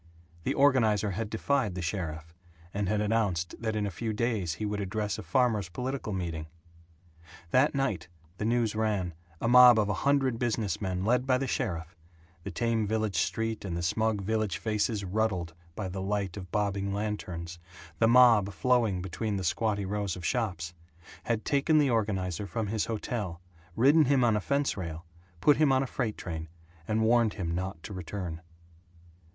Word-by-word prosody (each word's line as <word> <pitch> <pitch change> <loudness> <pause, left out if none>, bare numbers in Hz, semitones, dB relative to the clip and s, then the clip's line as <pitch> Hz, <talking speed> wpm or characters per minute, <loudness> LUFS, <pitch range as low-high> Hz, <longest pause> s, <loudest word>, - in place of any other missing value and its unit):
The - - 0
organizer 110 -7 +3
had 105 +3 -3
defied 115 -2 0
the 90 - -3
sheriff, 80 -2 -4 0.4
and 100 -1 -1
announced 105 -5 0
that 110 -1 -2
in 105 -1 0
a 100 - -3
few 110 +5 -3
days 105 -8 -1
he 105 - -4
would 105 0 -2
address 105 0 -2
a - - -4
farmers' 105 +1 +1
political 125 +4 -4
meeting. 85 -5 -3 1.0
That 135 +4 +3
night, 130 -12 -1 0.3
the - - -2
news 115 -1 +1
ran, 105 -5 -1 0.3
a - - -1
mob 125 -1 +9
of 105 -2 +2
a - - +1
hundred 135 -4 +2
business 110 -6 -1
men 95 -1 -2
led 125 +3 +2
by 130 -1 +4
the 135 - -2
sheriff 85 -8 -3 0.5
the 100 - -6
tame 115 +2 0
village 110 -3 -1
street 110 +5 -1
and 90 -4 -3
the 85 - -3
smug 110 +3 +1
village 110 0 -1
faces 105 -1 -1
ruddled 95 -4 -1 0.2
by 95 - -3
the 95 +1 -5
light 100 -1 -2
of 95 -3 -8
bobbing 100 0 -1
lanterns, 90 -5 -4 0.4
the 115 - +5
mob 115 -4 +6
flowing 105 -1 +1
between 100 +3 -3
the 95 - -3
squatty 100 +4 0
rows 100 -1 -2
of 90 -2 -7
shops 90 -9 -1 0.5
had 115 -2 -1
taken 145 +2 +3
the 145 -4 +4
organizer 100 -4 -1
from 110 +5 -2
his 105 +1 -1
hotel, 105 -5 -3 0.4
ridden 145 +6 +5
him 135 -1 +3
on 115 -3 +4
a 105 - 0
fence 140 +5 0
rail, 85 -2 -6 0.4
put 145 +4 +5
him 155 -3 +4
on 130 0 +3
a - - -2
freight 120 -4 -3
train, 80 -3 -5 0.4
and 110 +1 +1
warned 115 -1 +3
him 85 -5 -2
not 90 -1 -4
to 105 - -7
return. 90 -2 -5
105 Hz, 175 wpm, -29 LUFS, 95-115 Hz, 1.0 s, mob